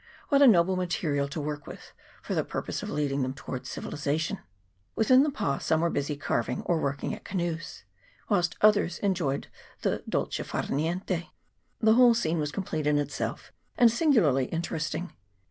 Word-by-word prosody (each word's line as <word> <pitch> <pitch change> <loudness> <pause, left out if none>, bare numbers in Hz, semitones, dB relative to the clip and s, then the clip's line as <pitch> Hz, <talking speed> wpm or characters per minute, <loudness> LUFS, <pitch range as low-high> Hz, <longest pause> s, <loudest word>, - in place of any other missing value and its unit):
What 280 -1 +4
a 280 - +9
noble 185 -4 +5
material 165 -6 -1
to 140 +3 -5
work 145 -1 -4
with - - -10 0.3
for - - -3
the - - +1
purpose - - -4
of - - -5
leading 145 -2 -1
them 130 +1 -2
towards 130 -1 -6
civilization! 150 +2 -2 0.6
Within 255 +4 +5
the 300 - +2
pa 140 - -1
some 160 0 +1
were 170 0 +1
busy 145 +1 -2
carving, 125 -3 -1
or 165 -2 +1
working 140 0 -2
at - - -8
canoes, 170 -3 -4 0.4
whilst 175 -5 +1
others 205 -5 +4
enjoyed 175 -9 -1 0.4
the - - 0
dolce - - -1
far - - -3
niente. 170 +4 -2 0.5
The 220 -1 +5
whole 240 0 +6
scene 165 -7 0
was 150 -1 -1
complete 160 -5 -3
in 150 0 +3
itself, 145 -1 -3 0.2
and 235 -2 +6
singularly 210 - +3
inter 165 0 -2
esting. 155 +3 -3
165 Hz, 170 wpm, -28 LUFS, 145-195 Hz, 0.6 s, a